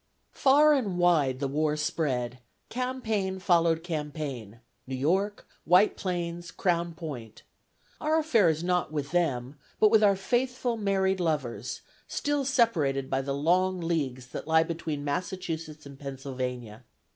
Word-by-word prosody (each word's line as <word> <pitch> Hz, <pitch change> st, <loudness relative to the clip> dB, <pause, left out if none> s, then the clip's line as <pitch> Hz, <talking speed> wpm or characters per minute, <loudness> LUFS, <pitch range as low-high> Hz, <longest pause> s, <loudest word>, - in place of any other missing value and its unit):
Far 295 Hz, +3 st, +5 dB
and 210 Hz, -11 st, 0 dB
wide 155 Hz, -7 st, +3 dB
the 140 Hz, -, -1 dB
war 150 Hz, +2 st, 0 dB
spread: 130 Hz, -5 st, -1 dB, 0.3 s
campaign 225 Hz, -6 st, -2 dB
followed 170 Hz, -3 st, +2 dB
campaign: 150 Hz, -, -5 dB, 0.3 s
New 130 Hz, -, -3 dB
York, 190 Hz, +10 st, 0 dB, 0.2 s
White 180 Hz, +6 st, +5 dB
Plains, 175 Hz, -2 st, -3 dB
Crown 170 Hz, -3 st, -1 dB
Point: 130 Hz, -, -8 dB, 0.6 s
our 310 Hz, +1 st, +2 dB
affair 240 Hz, -, +4 dB
is 160 Hz, +1 st, -1 dB
not 180 Hz, -2 st, 0 dB
with 150 Hz, -1 st, -3 dB
them, 145 Hz, -6 st, -1 dB, 0.2 s
but 215 Hz, -1 st, +5 dB
with 220 Hz, -1 st, +5 dB
our 200 Hz, -1 st, +5 dB
faithful 245 Hz, +4 st, 0 dB
married 195 Hz, -3 st, +1 dB
lovers, 130 Hz, -, -2 dB, 0.3 s
still 290 Hz, -1 st, -1 dB
separated 160 Hz, -, +1 dB
by 135 Hz, 0 st, +1 dB
the 140 Hz, 0 st, -3 dB
long 180 Hz, +5 st, +2 dB
leagues 145 Hz, -7 st, -2 dB
that -, -, -7 dB
lie 160 Hz, 0 st, +5 dB
between 160 Hz, -3 st, -4 dB
Massachusetts 160 Hz, 0 st, -4 dB
and 140 Hz, -1 st, -11 dB
Pennsylvania. 130 Hz, -4 st, -5 dB
165 Hz, 135 wpm, -28 LUFS, 140-195 Hz, 0.6 s, Far